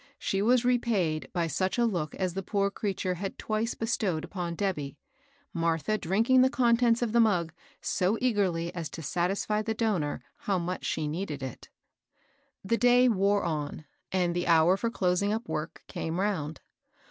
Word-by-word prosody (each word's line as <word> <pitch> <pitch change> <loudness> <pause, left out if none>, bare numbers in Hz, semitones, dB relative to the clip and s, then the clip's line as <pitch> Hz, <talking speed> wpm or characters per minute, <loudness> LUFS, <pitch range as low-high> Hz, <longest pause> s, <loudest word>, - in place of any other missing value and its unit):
She 195 - -1
was 245 +3 +3
repaid 215 -11 +1
by 175 -2 0
such 185 - -1
a 240 - +3
look 175 -9 -2
as 185 -2 -1
the 195 - -3
poor 200 0 0
creature 195 -3 -2
had 190 +2 -5
twice 220 +2 -2
bestowed 210 -8 -1
upon 175 -3 -4
Debby, 150 -8 -2 0.6
Martha 165 +3 0
drinking 225 +8 +3
the 260 - +5
contents 235 -1 +3
of 230 - -1
the 235 - +3
mug 180 -8 +2 0.3
so 190 +5 +1
eagerly 185 -8 0
as 170 -4 -4
to 165 - -8
satisfy 195 +6 0
the 220 +1 -2
donor 200 -10 -1
how 195 -2 -1
much 180 +1 -3
she 155 - -1
needed 150 -3 -4
it. 130 -3 -7 1.0
The 230 +4 +1
day 245 +1 +5
wore 200 -1 +2
on, 155 -2 -3 0.3
and 180 -2 +1
the 175 0 -1
hour 165 +2 +5
for 230 +4 -1
closing 195 -2 +1
up 225 +3 -2
work 155 +1 -4
came 165 +2 -4
round. 165 -7 -2
190 Hz, 170 wpm, -29 LUFS, 170-220 Hz, 1.0 s, the